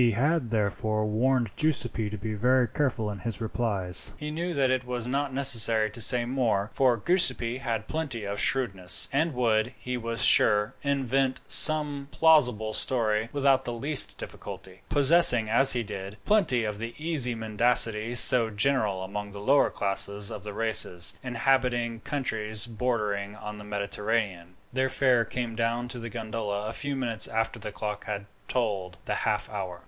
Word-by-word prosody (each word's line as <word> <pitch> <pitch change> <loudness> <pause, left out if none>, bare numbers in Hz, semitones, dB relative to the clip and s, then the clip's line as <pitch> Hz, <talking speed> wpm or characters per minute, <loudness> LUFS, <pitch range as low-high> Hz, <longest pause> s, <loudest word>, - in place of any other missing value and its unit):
He 120 -2 +2
had 140 +2 -1
therefore 110 0 -3
warned 120 +1 -1
Giuseppi 120 -8 0
to 105 - -8
be 110 +2 -6
very 125 +4 0
careful 115 -5 -3
in 100 - -9
his 115 -4 -6
replies. 105 -5 +1
He 150 0 -7
knew 170 +3 -5
that 135 -2 0
it 130 -1 -2
was 125 -2 -4
not 140 +2 -3
necessary 115 -5 +3
to 115 - -4
say 120 +2 +2
more, 120 -5 -2
for 130 -3 +1
Giuseppi 125 - -1
had 115 -5 -5
plenty 145 -8 -6
of 100 0 -6
shrewdness, 95 -9 +1
and 155 +1 -1
would, 115 -1 -1
he 125 0 -6
was 115 -1 -3
sure, 105 +3 +2
invent 135 -1 -2
some 150 -3 +5
plausible 125 -11 +2
story 110 -3 -1
without 135 -2 0
the 120 - -6
least 140 +5 +2
difficulty, 95 0 -11
possessing, 145 -5 +6
as 135 +5 +7
he 120 -1 -3
did, 100 -1 -9
plenty 175 - 0
of 105 -1 -6
the 115 +1 -7
easy 150 -7 0
mendacity 115 0 +3
so 120 -1 +9
general 105 -3 -1
among 100 +1 -8
the 100 - -10
lower 135 +8 +1
classes 100 +1 0
of 100 - -9
the 105 - -8
races 105 -5 +2
inhabiting 125 -2 -2
countries 110 -6 -4
bordering 105 -4 -4
on 105 0 -10
the - - -11
Mediterranean. 100 -3 -5 0.2
Their 130 +1 -1
fare 130 -3 0
came 120 -2 -6
down 120 +1 -3
to 120 - -7
the 115 0 -8
gondola 110 -2 -6
a 110 - -6
few 145 +1 -6
minutes 120 -4 -1
after 115 +1 -4
the 105 - -8
clock 105 0 -7
had 100 -2 -6 0.2
tolled 100 -7 -4
the - - -3
half - - -3
hour. 95 -4 -8
115 Hz, 165 wpm, -25 LUFS, 105-130 Hz, 0.2 s, so